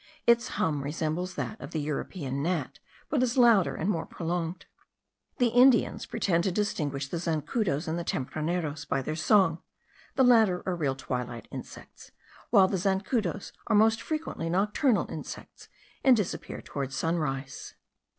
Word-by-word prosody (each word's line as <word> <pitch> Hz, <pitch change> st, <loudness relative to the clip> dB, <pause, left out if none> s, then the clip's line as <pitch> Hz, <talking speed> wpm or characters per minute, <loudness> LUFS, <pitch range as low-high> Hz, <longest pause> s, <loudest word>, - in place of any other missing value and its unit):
Its 235 Hz, 0 st, +4 dB
hum 150 Hz, -3 st, 0 dB
resembles 160 Hz, +5 st, -3 dB
that 220 Hz, -, -4 dB
of -, -, -7 dB
the 160 Hz, -, -3 dB
European 145 Hz, -1 st, -3 dB
gnat, 175 Hz, +3 st, -2 dB, 0.3 s
but 280 Hz, -, +1 dB
is 255 Hz, 0 st, 0 dB
louder 230 Hz, -7 st, +5 dB
and 170 Hz, -, -2 dB
more 170 Hz, -6 st, -1 dB
prolonged. 170 Hz, +1 st, -3 dB, 0.7 s
The 245 Hz, -1 st, +3 dB
Indians 245 Hz, 0 st, +4 dB
pretend 170 Hz, -3 st, +1 dB
to 190 Hz, -, +1 dB
distinguish 150 Hz, -9 st, -1 dB
the 165 Hz, -, -4 dB
zancudos 165 Hz, -, -1 dB
and 160 Hz, +2 st, -1 dB
the -, -, -3 dB
tempraneros 155 Hz, +1 st, -2 dB
by 135 Hz, -2 st, -1 dB
their 155 Hz, -, -3 dB
song; 170 Hz, -1 st, +3 dB, 0.5 s
the 265 Hz, -, +4 dB
latter 220 Hz, -7 st, +5 dB
are 185 Hz, -, -1 dB
real 145 Hz, -6 st, -1 dB
twilight 125 Hz, -3 st, -5 dB
insects, -, -, -10 dB, 0.4 s
while 190 Hz, -1 st, +6 dB
the 190 Hz, -, -1 dB
zancudos 195 Hz, +1 st, -1 dB
are -, -, +2 dB
most 220 Hz, +1 st, +4 dB
frequently 310 Hz, -, -3 dB
nocturnal 210 Hz, -, +2 dB
insects, -, -, -9 dB, 0.3 s
and 260 Hz, -3 st, +6 dB
disappear 205 Hz, -5 st, -3 dB
toward 135 Hz, -2 st, -4 dB
sunrise. 135 Hz, -3 st, -3 dB
175 Hz, 150 wpm, -28 LUFS, 150-210 Hz, 0.7 s, while